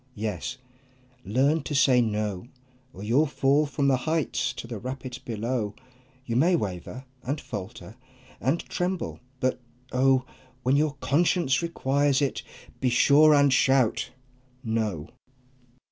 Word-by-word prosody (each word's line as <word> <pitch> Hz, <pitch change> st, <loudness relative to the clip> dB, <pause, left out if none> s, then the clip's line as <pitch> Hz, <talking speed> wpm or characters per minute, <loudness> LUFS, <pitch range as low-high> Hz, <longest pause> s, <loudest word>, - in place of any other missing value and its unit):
Yes, 105 Hz, -, -4 dB, 0.7 s
learn 135 Hz, +10 st, +2 dB
to 145 Hz, +1 st, -4 dB
say 130 Hz, -3 st, +5 dB
"No!" 105 Hz, -2 st, -2 dB, 0.4 s
Or 100 Hz, -, -10 dB
you'll 130 Hz, +9 st, +3 dB
fall 140 Hz, +2 st, +2 dB
from 140 Hz, -1 st, 0 dB
the 135 Hz, -2 st, +4 dB
heights 130 Hz, -5 st, 0 dB
to -, -, -7 dB
the 115 Hz, -2 st, -6 dB
rapids 130 Hz, +2 st, -6 dB
below! 115 Hz, -2 st, -3 dB, 0.5 s
You 115 Hz, -, -3 dB
may 170 Hz, +8 st, +4 dB
waver, 105 Hz, -, -4 dB, 0.2 s
and 140 Hz, +4 st, -3 dB
falter, 105 Hz, 0 st, -8 dB, 0.4 s
and 140 Hz, +6 st, +1 dB
tremble, 180 Hz, 0 st, -3 dB, 0.2 s
but 130 Hz, -1 st, 0 dB, 0.3 s
oh! 130 Hz, 0 st, +3 dB, 0.4 s
When 130 Hz, +2 st, +3 dB
your 150 Hz, 0 st, +1 dB
conscience 155 Hz, -3 st, +2 dB
requires 145 Hz, -4 st, +1 dB
it, 140 Hz, -2 st, -1 dB, 0.4 s
be 130 Hz, -, +1 dB
sure 150 Hz, +5 st, +6 dB
and 140 Hz, -2 st, +4 dB
shout 130 Hz, -3 st, +2 dB, 0.5 s
"No!" 110 Hz, -, -2 dB
130 Hz, 130 wpm, -26 LUFS, 115-145 Hz, 0.7 s, sure